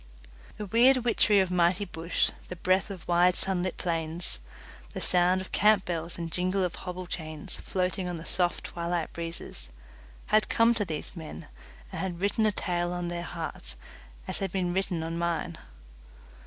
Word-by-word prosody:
The 210 - -4
weird 240 +6 +5
witchery 215 -3 +4
of 185 -1 -1
mighty 180 +2 +3
bush, 170 -1 0 0.2
the 180 - -6
breath 185 +3 +1
of 190 -5 -8
wide 175 +1 +4
sunlit 185 -1 -1
plains, 165 - +2 0.6
the - - -2
sound 180 +1 +3
of 185 - -9
camp 210 -2 +4
bells 170 -1 -3
and 165 -1 -4
jingle 185 +2 +1
of 180 - -1
hobble 180 0 -6
chains, 155 -3 -3
floating 185 0 -2
on 175 -1 -3
the 165 - -9
soft 175 -1 +1
twilight 170 -1 -3
breezes, 165 - -4 0.6
had 215 0 +5
come 230 +1 +5
to 220 -3 -1
these 160 +1 -4
men 155 - -8 0.4
and - - -4
had 180 -3 -3
written 205 +3 +2
a - - +3
tale 175 -3 -1
on 175 -1 -3
their 175 0 -3
hearts 160 - -5 0.5
as - - +2
had 195 -2 -2
been 180 -2 0
written 185 -3 -1
on 165 +1 -3
mine. 170 -1 -2
180 Hz, 170 wpm, -28 LUFS, 170-190 Hz, 0.6 s, weird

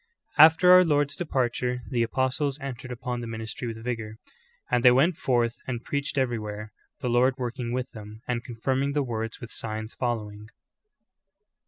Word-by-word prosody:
After 165 +4 +8
our 180 0 +10
Lcjrd's 145 -3 +1
departure 125 -5 -1
the 120 -2 +1
apostles 130 +4 0
entered 135 -2 -6
upon 125 0 -4
tlic 115 - -5
ministry 110 +2 -5
with 115 -1 -6
vigor: 115 -3 -4 0.5
"And 120 -1 +2
they 125 - +9
went 140 +8 +4
forth 120 -5 0
and 125 -2 -3
preached 145 0 -3
everywhere, 110 -4 -2 0.3
the - - -2
Lord 125 +2 +3
working 120 -2 -3
with 125 0 -3
them, 110 0 -11
and 120 -1 -1
confirming 130 +4 -1
the 145 -1 +1
word 115 -3 -4
with 120 - -9
signs 110 0 -4
following." 105 -4 -3
125 Hz, 160 wpm, -26 LUFS, 115-135 Hz, 0.5 s, our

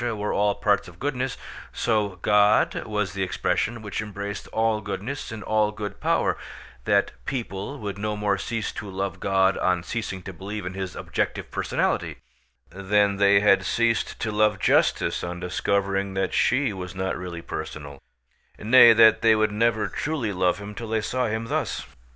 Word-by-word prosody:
were 110 -4 -2
all 100 0 +2
parts 105 -1 +1
of 85 -1 -13
goodness, 130 +1 -2 0.3
so 105 -4 0
God 105 0 +3
was 105 -4 -2
the 100 - -4
expression 95 +4 -1
which 100 +1 -3
embraced 100 -1 -6
all 110 -1 0
goodness 105 +8 -5
and 110 -1 -7
all 105 -1 +1
good 105 -1 -6
power; - - +1 0.5
that 100 -1 +2
people 115 0 -4
would 100 -5 -5
no 105 0 -2
more 100 -2 0
cease 115 +1 -3
to 105 - -7
love 95 -1 -4
God 95 0 +2
on 90 -2 +1
ceasing 100 -3 -4
to 95 - -7
believe 100 +3 -6
in 90 - -4
His 95 -1 -5
objective - - -3
personality, - - -1 0.5
than 100 +2 +1
they 100 0 +5
had 105 -1 +4
ceased 115 -1 0
to 110 - -1
love 105 -1 +2
justice - - +2
on 90 0 -4
discovering 95 +2 -1
that 95 -1 -1
she 125 -3 +2
was 90 -1 -7
not 95 0 -2
really 85 -2 -6
personal; 70 -2 -7 0.6
nay, 115 +1 +7
that 115 0 +6
they 110 -1 +5
would 110 -1 +2
never 110 -1 +1
truly 125 - -2
love 90 -1 +1
Him 100 0 -8
till 115 +2 -7
they 110 0 0
saw 125 +4 -1
Him 110 +1 -2
thus. - - -2
105 Hz, 170 wpm, -25 LUFS, 95-110 Hz, 0.6 s, nay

